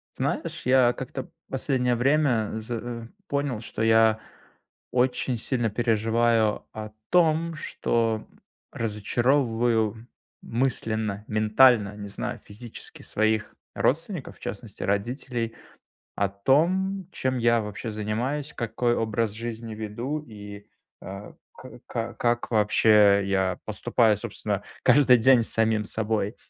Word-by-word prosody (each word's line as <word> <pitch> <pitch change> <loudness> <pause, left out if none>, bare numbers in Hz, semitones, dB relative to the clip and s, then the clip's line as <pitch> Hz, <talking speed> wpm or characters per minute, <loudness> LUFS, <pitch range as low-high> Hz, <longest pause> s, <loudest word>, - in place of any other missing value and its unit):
Знаешь, - - -3
я 125 -1 +5
как-то - - -6 0.2
последнее 125 -2 0
время, 130 -4 +2
з 110 +1 -7
э, 115 0 -5 0.2
понял, 140 -5 -1
что 110 - -5
я 110 0 +5 0.7
очень 125 0 +1
сильно 120 0 -1
переживаю 115 0 +1
о 110 0 -6 0.2
том, 165 -1 +3
что 115 -7 -1 0.4
разочаровываю 115 0 0 0.3
мысленно, 110 -4 -1
ментально, 110 0 +4
не 100 -1 -7
знаю, 120 +3 -5
физически, 110 +3 -9
своих 110 0 0 0.2
родственников, 165 +2 -1
в - - -26
частности, - - -7
родителей, 115 +3 -2 0.6
о 100 - +1
том, 175 - +1
чем 130 -1 -1
я 115 -1 +3
вообще 105 +2 -5
занимаюсь, 120 +8 -2
какой 120 +1 0
образ 110 0 0
жизни 115 0 -6
веду, 115 +8 -4
и, 105 -2 -10 0.4
э, 100 +2 -8 0.2
к - - -11 0.2
ка 115 +1 -3
как, 120 0 0
вообще, 105 -2 +5
я 95 -2 0
поступаю, 110 +1 +2
собственно, 105 - -3 0.2
каждый 125 -1 +6
день 125 +1 +5
с - - -2
самим 110 -1 +2
собой. 105 0 -2
115 Hz, 115 wpm, -26 LUFS, 110-125 Hz, 0.7 s, каждый